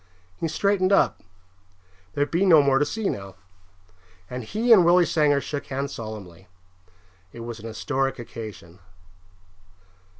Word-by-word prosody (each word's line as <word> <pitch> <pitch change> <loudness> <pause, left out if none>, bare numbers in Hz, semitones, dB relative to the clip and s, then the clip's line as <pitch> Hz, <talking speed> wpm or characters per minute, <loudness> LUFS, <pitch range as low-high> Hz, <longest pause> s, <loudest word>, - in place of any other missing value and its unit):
He 165 - -2
straightened 195 +3 +1
up 195 - +3 0.9
there'd 145 0 0
be 170 +4 +1
no 165 -6 +6
more 135 -1 +3
to 145 - +2
see 215 +6 -2
now 100 - -5 1.0
and 125 0 -5
he 225 - +3
and 190 -5 +7
Willie 175 +1 +5
Sanger 150 -4 +2
shook 140 0 -5
hands 140 +1 -4
solemnly. 100 -5 -9 0.8
It 115 - -10
was 115 0 -7
an 115 - -8
historical 130 +3 -2
occasion. 105 -7 -10
140 Hz, 135 wpm, -24 LUFS, 115-170 Hz, 1.0 s, and